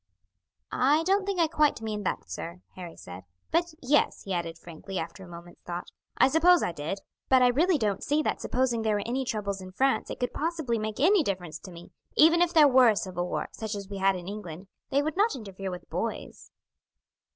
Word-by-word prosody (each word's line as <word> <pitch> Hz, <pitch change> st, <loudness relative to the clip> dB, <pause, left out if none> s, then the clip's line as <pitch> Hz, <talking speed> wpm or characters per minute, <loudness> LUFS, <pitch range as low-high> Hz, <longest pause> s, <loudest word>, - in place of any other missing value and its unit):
"I 290 Hz, +5 st, +3 dB
don't 390 Hz, +3 st, +1 dB
think 395 Hz, -3 st, -1 dB
I 335 Hz, -, +5 dB
quite 300 Hz, -3 st, +2 dB
meant 215 Hz, -2 st, -4 dB
that, -, -, -2 dB
sir," 170 Hz, +2 st, -7 dB
Harry 175 Hz, -3 st, -8 dB
said; 90 Hz, +1 st, -10 dB, 0.3 s
"but 340 Hz, +1 st, +1 dB
yes," 290 Hz, +4 st, +2 dB
he 195 Hz, -, -4 dB
added 170 Hz, -2 st, -3 dB
frankly, 175 Hz, +3 st, -8 dB
after 170 Hz, +3 st, -5 dB
a -, -, -11 dB
moment's 170 Hz, 0 st, -12 dB
thought, 175 Hz, 0 st, -6 dB, 0.3 s
"I -, -, +6 dB
suppose 330 Hz, +5 st, +5 dB
I -, -, 0 dB
did; 165 Hz, +5 st, -5 dB, 0.3 s
but 260 Hz, -1 st, +6 dB
I 250 Hz, -, +6 dB
really 325 Hz, +7 st, +3 dB
don't 210 Hz, -6 st, -1 dB
see 295 Hz, +2 st, +1 dB
that -, -, -1 dB
supposing 245 Hz, -2 st, 0 dB
there 220 Hz, -1 st, +1 dB
were 205 Hz, -, -1 dB
any 260 Hz, +3 st, -1 dB
troubles 200 Hz, -4 st, -3 dB
in 185 Hz, 0 st, -10 dB
France 265 Hz, +6 st, +1 dB
it -, -, -6 dB
could 245 Hz, -, -2 dB
possibly 310 Hz, -7 st, -1 dB
make 215 Hz, +1 st, -4 dB
any 370 Hz, +7 st, +5 dB
difference 180 Hz, -, -3 dB
to 185 Hz, -, -11 dB
me; 170 Hz, 0 st, -12 dB, 0.2 s
even 330 Hz, +2 st, +6 dB
if 350 Hz, -1 st, +3 dB
there 310 Hz, -4 st, +7 dB
were 255 Hz, -3 st, +6 dB
a 215 Hz, -, +2 dB
civil 180 Hz, -3 st, -3 dB
war, -, -, -3 dB
such 220 Hz, -2 st, -5 dB
as 200 Hz, -1 st, -7 dB
we 200 Hz, -1 st, -5 dB
had 195 Hz, 0 st, +3 dB
in 180 Hz, -1 st, -7 dB
England, 190 Hz, -3 st, -7 dB, 0.2 s
they 280 Hz, +1 st, +2 dB
would 310 Hz, +3 st, -3 dB
not 420 Hz, -1 st, +3 dB
interfere 195 Hz, -5 st, -6 dB
with 180 Hz, -1 st, -8 dB
boys." -, -, -5 dB
215 Hz, 220 wpm, -28 LUFS, 185-295 Hz, 0.3 s, there